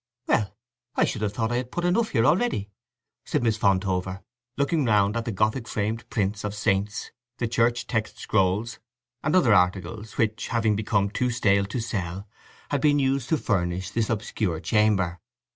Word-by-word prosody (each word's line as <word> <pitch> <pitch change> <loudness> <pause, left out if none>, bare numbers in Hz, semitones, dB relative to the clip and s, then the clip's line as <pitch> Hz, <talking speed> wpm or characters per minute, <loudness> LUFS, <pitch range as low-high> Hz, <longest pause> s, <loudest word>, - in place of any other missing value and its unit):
"Well, 105 -2 0 0.4
I - - +4
should 110 - -3
have 105 -2 -1
thought 115 +1 -1
I 120 - +1
had 125 0 -4
put 175 - -2
enough 215 +6 +2
here 115 - +2
already," 150 - +1 0.5
said - - -1
Miss 115 -2 +2
Fontover, 95 -2 0 0.3
looking 140 +2 +1
round 105 -3 +3
at 115 -1 -2
the 115 - -2
Gothic 110 +4 0
framed 110 +2 -3
prints 100 -1 -1
of 105 0 -3
saints, 105 0 -1 0.3
the 120 - -1
Church 120 +1 +1
text 110 -2 -2
scrolls, 105 +3 0 0.4
and 155 +3 +1
other 135 - +5
articles 90 +3 0
which, 110 0 0
having 110 -3 +1
become 100 -1 0
too 125 +3 0
stale 100 -4 +2
to 105 +5 -4
sell, 100 -4 -4 0.4
had 145 -2 +1
been 145 0 +4
used 135 -2 0
to 160 - +3
furnish 95 -7 -1
this 115 -2 0
obscure 105 -6 -1
chamber. 95 -4 +1
110 Hz, 175 wpm, -25 LUFS, 100-120 Hz, 0.5 s, other